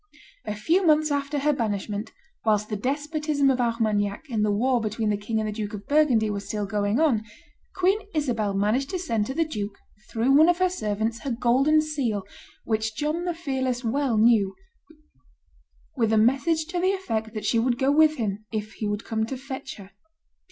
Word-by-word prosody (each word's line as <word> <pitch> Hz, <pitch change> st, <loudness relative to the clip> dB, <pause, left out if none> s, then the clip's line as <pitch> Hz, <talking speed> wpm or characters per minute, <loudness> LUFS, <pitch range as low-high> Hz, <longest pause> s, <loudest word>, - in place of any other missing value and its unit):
A 210 Hz, -, -3 dB
few 325 Hz, -, +2 dB
months 310 Hz, -2 st, +3 dB
after 285 Hz, +1 st, -1 dB
her 295 Hz, +1 st, +2 dB
banishment, 210 Hz, -3 st, -3 dB, 0.3 s
whilst 210 Hz, -1 st, +1 dB
the 210 Hz, -, -2 dB
despotism 290 Hz, +4 st, 0 dB
of 255 Hz, -1 st, 0 dB
Armagnac 220 Hz, 0 st, 0 dB
and 215 Hz, -2 st, +1 dB
the 210 Hz, -, +2 dB
war 240 Hz, +4 st, +2 dB
between 215 Hz, 0 st, -1 dB
the -, -, +1 dB
king 210 Hz, +2 st, -3 dB
and 215 Hz, -, -1 dB
the -, -, -2 dB
Duke 210 Hz, -1 st, -4 dB
of 205 Hz, -, -9 dB
Burgundy 285 Hz, -7 st, +3 dB
were 200 Hz, -, -2 dB
still 205 Hz, +1 st, -4 dB
going 205 Hz, +3 st, 0 dB
on, 265 Hz, -9 st, +2 dB, 0.5 s
Queen 375 Hz, +3 st, +2 dB, 0.2 s
Isabel 230 Hz, -9 st, 0 dB
managed 215 Hz, +7 st, +1 dB
to 375 Hz, -, -2 dB
send 230 Hz, -12 st, -1 dB
to 265 Hz, -, -4 dB
the 330 Hz, +1 st, +2 dB
duke, 210 Hz, -8 st, -5 dB, 0.3 s
through 235 Hz, +4 st, +1 dB
one 310 Hz, +5 st, +6 dB
of 350 Hz, -, +3 dB
her 370 Hz, 0 st, +2 dB
servants, 220 Hz, -, -2 dB
her 275 Hz, -, -5 dB
golden 260 Hz, +6 st, +3 dB
seal, 270 Hz, -10 st, -2 dB, 0.4 s
which 220 Hz, -1 st, -1 dB
John 305 Hz, +7 st, -2 dB
the 350 Hz, -2 st, -1 dB
Fearless 260 Hz, -6 st, -2 dB
well 245 Hz, 0 st, 0 dB
knew, 215 Hz, -4 st, +4 dB, 1.4 s
with 225 Hz, -4 st, +1 dB
a 220 Hz, -, +3 dB
message 275 Hz, +8 st, +2 dB
to 355 Hz, 0 st, -2 dB
the 375 Hz, +2 st, +2 dB
effect 225 Hz, -, -3 dB
that 210 Hz, -1 st, -4 dB
she 230 Hz, -, +2 dB
would 240 Hz, +1 st, +1 dB
go 270 Hz, +2 st, +2 dB
with 310 Hz, +1 st, +5 dB
him 215 Hz, -4 st, -3 dB
if 215 Hz, -1 st, -4 dB
he 215 Hz, -, -4 dB
would 205 Hz, +1 st, -3 dB
come 220 Hz, -1 st, -1 dB
to 265 Hz, -, -4 dB
fetch 265 Hz, 0 st, -7 dB
her. 195 Hz, -1 st, -13 dB
235 Hz, 195 wpm, -25 LUFS, 215-295 Hz, 1.4 s, one